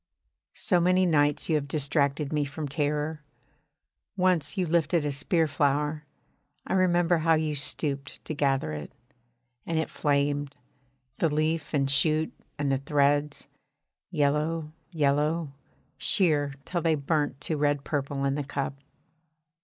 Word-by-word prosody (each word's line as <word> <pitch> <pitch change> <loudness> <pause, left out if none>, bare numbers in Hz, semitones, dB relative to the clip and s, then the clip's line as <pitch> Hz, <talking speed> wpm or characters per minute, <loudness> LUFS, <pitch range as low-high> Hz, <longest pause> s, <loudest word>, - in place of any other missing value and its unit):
So 180 -4 +2
many 185 +2 +3
nights 145 -4 +2
you 165 - +1
have 145 -1 -4
distracted 140 0 0
me 150 -1 +1
from 145 +2 -5
terror. 150 +2 -1 1.0
Once 180 -6 +1
you 185 - +1
lifted 165 -1 +1
a 145 - 0
spear 160 +4 +1
flower. 150 +1 0 0.6
I - - -2
remember 175 -2 +3
how 165 +1 +3
you 155 -1 0
stooped 140 0 -2
to - - -4
gather 135 - 0
it 75 -1 -6 0.7
and 165 - -2
it 160 - -1
flamed, 145 -1 0 0.6
the 165 - +2
leaf 155 +2 0
and 140 -3 +1
shoot 155 +3 +2 0.2
and 145 -1 0
the 135 - +1
threads, 145 +1 +1 0.6
yellow, 155 0 0 0.2
yellow 150 0 +1 0.5
sheer 150 -8 +2
till 175 -2 -2
they 165 -1 +2
burnt 145 -1 -1
to 160 - -1
red 145 -1 +1
purple 140 -2 -2
in 135 - +1
the 145 +1 -2
cup. 140 0 -3
150 Hz, 140 wpm, -27 LUFS, 140-160 Hz, 1.0 s, many